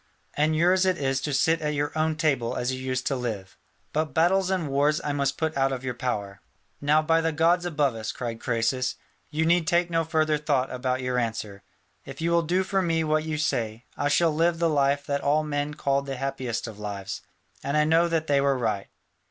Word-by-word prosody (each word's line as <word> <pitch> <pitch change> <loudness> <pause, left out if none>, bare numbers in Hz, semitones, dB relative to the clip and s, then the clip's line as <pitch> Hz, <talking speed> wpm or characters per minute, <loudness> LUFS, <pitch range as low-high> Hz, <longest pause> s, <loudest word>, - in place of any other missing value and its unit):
And 155 +2 +1
yours 180 +4 +4
it 185 -2 +2
is 135 -2 0
to 150 - -2
sit 160 +4 +2
at 150 -1 -1
your 145 +1 -2
own 155 0 +1
table 140 -7 0
as 125 +1 -1
you 130 - -4
used 130 -1 -2
to 140 - 0
live. 110 -7 -4 0.4
But 155 -2 -1
battles 185 +3 +3
and 185 -5 0
wars 145 +2 +2
I 145 - -1
must 140 -1 0
put 160 -1 -1
out 135 0 +2
of 130 -1 -4
your 125 -1 -2
power." 105 -5 -4 0.4
"Now 150 +2 +3
by 165 +1 +3
the 165 0 0
gods 170 +3 +2
above 145 -6 +1
us," 110 -1 -4
cried 115 -2 -5
Croesus, 125 +2 0 0.3
"you 160 +2 0
need 170 -1 +3
take 175 +1 +2
no 165 0 +2
further 155 -2 +1
thought 140 -3 0
about 130 0 -2
your 125 0 0
answer: 110 -4 -4 0.4
if 135 0 -10
you 165 +1 0
will 170 0 +4
do 180 +4 +1
for 190 0 0
me 165 -2 +1
what 155 0 +1
you 155 -1 -2
say, 115 -6 -2
I 145 - 0
shall 165 +2 +3
live 165 +2 +2
the 165 -1 +1
life 140 -1 +2
that 140 0 -1
all 150 +2 +2
men 145 0 -2
called 140 0 0
the 135 - -3
happiest 130 -3 -3
of 110 -2 -9
lives, 100 -2 -5 0.4
and 140 +2 0
I 150 - +5
knew 165 +2 +3
that 165 -1 0
they 140 -2 +2
were 140 -1 +2
right." 110 -5 -1
145 Hz, 225 wpm, -26 LUFS, 130-160 Hz, 0.4 s, I